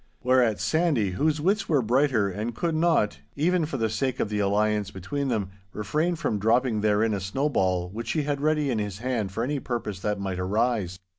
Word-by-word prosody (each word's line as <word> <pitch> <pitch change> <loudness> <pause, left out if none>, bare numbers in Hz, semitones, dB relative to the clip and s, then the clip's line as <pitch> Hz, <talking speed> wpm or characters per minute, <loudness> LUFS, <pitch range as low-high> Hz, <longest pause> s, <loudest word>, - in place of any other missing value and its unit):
Whereat 125 -6 +3
Sandy, 115 - +1
whose 150 +10 +1
wits 195 +8 +1
were 145 -6 +3
brighter, 120 -4 +2 0.2
could 170 +4 -1
not, 160 -9 +2 0.2
even 165 +2 +1
for 140 - -3
the 115 -2 +1
sake 120 +4 -2
of 105 - 0
the 105 -1 -1
alliance 105 0 +1
between 135 +10 -4
them, 105 -7 -1 0.2
refrain 155 - 0
from 110 -9 -1
dropping 115 +1 +2
therein 105 +1 +2
a 100 - -1
snowball 95 -5 0
which 110 +6 -4
he 155 - 0
had 140 -1 -2
ready 150 -2 +1
in 115 - 0
his 105 -2 -3
hand 115 -4 -2
for 115 +4 -2
any 140 +3 -1
purpose 115 -7 -4
that 105 +1 -2
might 95 -2 -3
arise. 100 -1 0
115 Hz, 195 wpm, -26 LUFS, 100-145 Hz, 0.2 s, Whereat